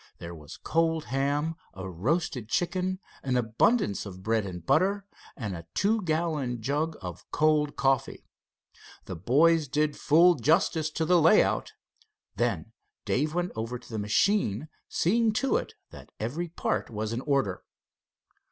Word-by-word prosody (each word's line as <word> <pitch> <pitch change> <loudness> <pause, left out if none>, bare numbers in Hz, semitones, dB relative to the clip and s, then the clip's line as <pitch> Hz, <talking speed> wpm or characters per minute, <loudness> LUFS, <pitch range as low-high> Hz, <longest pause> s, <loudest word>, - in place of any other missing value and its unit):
There 85 0 -8
was 75 -1 -11
cold 160 -1 0
ham, 145 +4 0 0.2
a 95 0 -6
roasted 120 - -2
chicken, 185 +3 -1 0.2
an 130 -2 0
abundance 115 - +1
of 95 -2 -9
bread 110 -1 0
and 90 -3 -8
butter, 200 - +2 0.3
and 105 -7 -4
a 85 0 -9
two 215 +2 +2
gallon 155 - -1
jug 150 +7 -1
of 90 -2 -7
cold 150 -1 +2
coffee. 135 -2 0 0.8
The 95 - -6
boys 150 - +3
did 150 +2 0
full 170 +4 +5
justice 155 +2 +2
to 160 +1 -2
the 175 +1 +4
layout. 165 +7 +3 0.6
Then - - -1 0.3
Dave 150 +4 0
went 175 0 -1
over 115 +2 -3
the 115 -2 -7
machine, 115 - +1 0.2
seeing 220 +5 +2
to 270 +4 +1
it - - -6 0.2
that - - -12
every 145 +11 -3
part 165 - -2
was 110 0 -3
in 120 - -2
order. 135 -10 0
145 Hz, 145 wpm, -28 LUFS, 110-165 Hz, 0.8 s, full